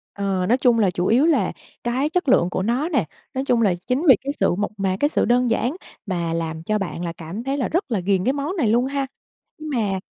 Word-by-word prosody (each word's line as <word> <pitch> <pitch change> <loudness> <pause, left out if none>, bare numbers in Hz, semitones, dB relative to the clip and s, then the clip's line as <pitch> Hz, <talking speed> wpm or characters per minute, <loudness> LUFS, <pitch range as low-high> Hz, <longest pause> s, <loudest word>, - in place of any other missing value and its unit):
Ờ, 195 -2 -1
nói 245 - +4
chung 245 -3 +3
là 200 -4 +3
chủ 180 0 -2
yếu 250 +7 +4
là 330 - +2 0.3
cái 255 +5 0
chất 355 -3 0
lượng 180 -8 +4
của 185 - -2
nó 250 - 0
nè. 275 - +1 0.3
Nói 265 +1 -2
chung 240 -3 +2
là 195 -5 +3
chính 260 +5 0
vì 265 - +9
cái 280 +1 -3
sự - - +2
mộc 205 +2 -2
mạc, 190 -1 0
cái 290 - +3
sự - - +1
đơn 245 0 +3
giản 240 +5 0 0.3
mà 170 -4 -2
làm 165 -1 -3
cho 215 +5 0
bạn 185 -3 -4
là 170 - -3
cảm 175 +8 -6
thấy 270 +2 -2
là 265 - 0
rất 340 -5 -2
là 215 - +1
ghiền 190 0 +1
cái 260 - +2
món 290 +6 -3
này 275 -9 +2
luôn 240 +3 +3
ha. 275 0 -1 0.5
Nhưng 310 0 -6
mà 200 -5 0
235 Hz, 260 wpm, -22 LUFS, 190-275 Hz, 0.5 s, vì